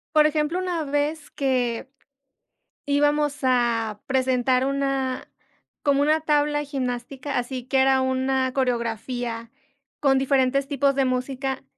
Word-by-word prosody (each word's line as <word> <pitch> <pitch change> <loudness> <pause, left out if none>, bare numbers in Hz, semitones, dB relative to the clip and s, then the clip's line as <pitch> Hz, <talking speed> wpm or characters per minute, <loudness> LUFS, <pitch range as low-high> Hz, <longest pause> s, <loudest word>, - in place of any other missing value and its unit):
Por 305 0 +7
ejemplo, 305 +3 0
una 355 -4 -2
vez 290 +2 -2
que 255 -2 -1 1.0
íbamos 290 0 +2
a 235 -4 +1
presentar 260 -1 +2
una 275 -2 -1 0.6
como 285 -1 +3
una 310 +2 +3
tabla 295 -1 +1
gimnástica, 265 0 -3
así 245 0 -4
que 265 +1 0
era 265 0 +4
una 260 0 0
coreografía 235 -2 -2 0.5
con 270 -2 +3
diferentes 270 0 +2
tipos 280 -1 +2
de 270 -1 +2
música, 260 +1 -2
265 Hz, 115 wpm, -24 LUFS, 255-285 Hz, 1.0 s, Por